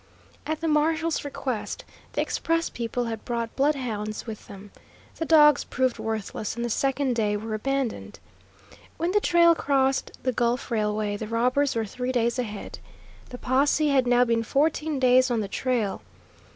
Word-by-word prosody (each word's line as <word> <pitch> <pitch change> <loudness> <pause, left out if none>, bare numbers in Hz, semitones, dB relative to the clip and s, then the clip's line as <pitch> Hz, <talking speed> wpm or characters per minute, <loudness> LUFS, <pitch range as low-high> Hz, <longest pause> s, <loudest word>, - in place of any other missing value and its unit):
At 315 +1 -2
the 330 - -1
marshal's 320 +1 +1
request 265 -5 -4 0.3
the - - 0
express 330 0 -1
people 235 +1 -3
had 225 -2 -5
brought 235 -2 -3
bloodhounds 245 -7 -1
with 220 -3 -8
them. 200 0 -11 0.5
The 325 - -2
dogs 300 -3 +6
proved 255 -1 -1
worthless, 215 -1 -4
and 235 0 -3
the 240 - -2
second 270 0 0
day 210 -2 +1
were 220 +1 -5
abandoned. 270 +2 -2 0.8
When 340 +2 0
the 415 +1 +2
trail 340 -2 +5
crossed 270 -4 +1
the 255 - +1
Gulf 240 +2 -1
Railway 210 -2 0
the 220 - -5
robbers 250 +5 +1
were 225 -1 0
three 250 +4 -3
days 240 0 0
ahead. 210 -4 -5 0.5
The 250 - -8
posse 285 +4 +2
had 265 -3 +3
now 245 0 +4
been 230 -1 +1
fourteen 300 +4 0
days 255 0 +4
on 235 -2 0
the 205 - -3
trail. 230 -2 -1
250 Hz, 165 wpm, -25 LUFS, 225-285 Hz, 0.8 s, dogs